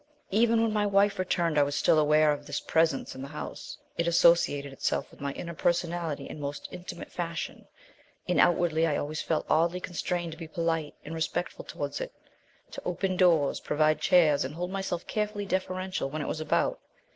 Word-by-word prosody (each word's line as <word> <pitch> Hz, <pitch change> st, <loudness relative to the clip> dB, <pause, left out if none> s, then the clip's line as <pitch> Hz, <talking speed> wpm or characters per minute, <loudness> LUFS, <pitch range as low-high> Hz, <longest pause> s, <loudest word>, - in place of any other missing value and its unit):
"Even 225 Hz, +2 st, +4 dB
when 225 Hz, -1 st, +1 dB
my 210 Hz, -1 st, +2 dB
wife 200 Hz, 0 st, +3 dB
returned 170 Hz, -4 st, +1 dB
I -, -, +6 dB
was 145 Hz, 0 st, +1 dB
still 155 Hz, -, +4 dB
aware 150 Hz, 0 st, +4 dB
of 145 Hz, -, -4 dB
this -, -, -2 dB
Presence 160 Hz, -4 st, +1 dB
in 130 Hz, -, -8 dB
the 135 Hz, -, -5 dB
house; 150 Hz, +2 st, -7 dB, 0.2 s
it 170 Hz, -, +2 dB
associated 165 Hz, -5 st, +4 dB
itself -, -, -1 dB
with -, -, -17 dB
my 140 Hz, 0 st, -2 dB
inner 170 Hz, +3 st, -6 dB
personality 170 Hz, -2 st, -1 dB
in -, -, -8 dB
most 145 Hz, 0 st, -5 dB
intimate 180 Hz, 0 st, -8 dB
fashion; 170 Hz, -2 st, -5 dB, 0.6 s
and -, -, +2 dB
outwardly 165 Hz, -2 st, +3 dB
I 150 Hz, -, +1 dB
always 155 Hz, +2 st, -3 dB
felt 160 Hz, -2 st, -1 dB
oddly 170 Hz, +3 st, +2 dB
constrained 175 Hz, -1 st, -3 dB
to 160 Hz, -, -10 dB
be 165 Hz, -, -6 dB
polite 165 Hz, -2 st, -1 dB
and 155 Hz, -, -6 dB
respectful 175 Hz, -, -3 dB
towards -, -, -4 dB
it -, -, -4 dB, 0.6 s
to -, -, -7 dB
open 185 Hz, +1 st, -1 dB
doors, 170 Hz, -6 st, +3 dB
provide 155 Hz, 0 st, +1 dB
chairs 155 Hz, -4 st, +4 dB
and 135 Hz, +3 st, -5 dB
hold 180 Hz, +2 st, -3 dB
myself 190 Hz, -3 st, -3 dB
carefully 210 Hz, -1 st, -2 dB
deferential 185 Hz, -4 st, -2 dB
when 150 Hz, +2 st, -3 dB
it -, -, -5 dB
was -, -, -3 dB
about. 155 Hz, -, +1 dB
170 Hz, 190 wpm, -28 LUFS, 155-180 Hz, 0.6 s, I